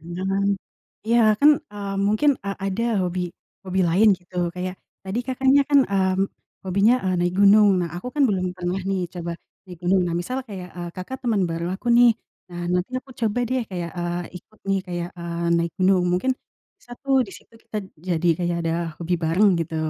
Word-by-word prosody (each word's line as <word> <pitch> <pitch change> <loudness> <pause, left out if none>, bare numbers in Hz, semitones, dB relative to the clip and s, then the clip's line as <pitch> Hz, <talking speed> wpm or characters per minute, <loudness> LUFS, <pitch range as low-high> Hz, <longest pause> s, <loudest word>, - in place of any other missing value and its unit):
Jangan 195 +2 -1 0.6
iya, 235 +1 +4 0.2
kan, 295 +1 +8 0.2
eee, 200 -1 -5
mungkin, 215 +8 +3
eee, 200 0 -3
ada 195 +4 -1 0.2
hobi 180 0 -1 0.4
hobi 190 0 -1
lain, 195 +7 +5
gitu, 180 +1 -25 0.2
kayak, 180 +1 -4 0.3
tadi 195 +4 -3
Kakaknya 265 +2 +3
kan, 285 - +7
mmm, 190 0 +1 0.4
hobinya, 200 +5 +4
eee, 185 -1 +1
naik 175 +1 0
gunung. 205 +1 +7
Nah, 175 - -1
aku 180 - -7
kan 295 - +2
belum 185 -3 0
pernah 180 +1 -2
nih, 195 -1 0
coba 175 -1 -4 0.3
naik 180 -3 -11
gunung, 185 +2 +3
nah, 170 - -2
misal 250 +9 -3
kayak, 185 -3 -7
eee, 175 -1 -5
Kakak 185 +9 -6
temen 225 -6 +1
baru 165 +1 -3
aku 225 - -11
nih. 245 0 +7 0.4
Nah, 175 0 -6
nanti 180 +3 0
aku 265 - -19
coba 220 +1 +1
deh 255 -1 0
kayak, 175 -2 -4
eee, 175 0 -2 0.2
ikut 215 +4 -15
nih, 195 0 +2
kayak, 175 -1 -3
eee, 170 0 -3
naik 170 0 0
gunung. 185 -1 +4
Mungkin, 185 +9 +1 0.5
bisa 245 - -14
tuh, 275 -1 +1
di 195 - -11
situ - - -20
kita - - -7 0.3
jadi 175 -1 0
kayak 175 -1 -1
ada 165 - 0 0.3
hobi 175 +1 -1
bareng, 185 +6 +4
gitu. 165 0 -4
190 Hz, 190 wpm, -23 LUFS, 175-210 Hz, 0.6 s, kan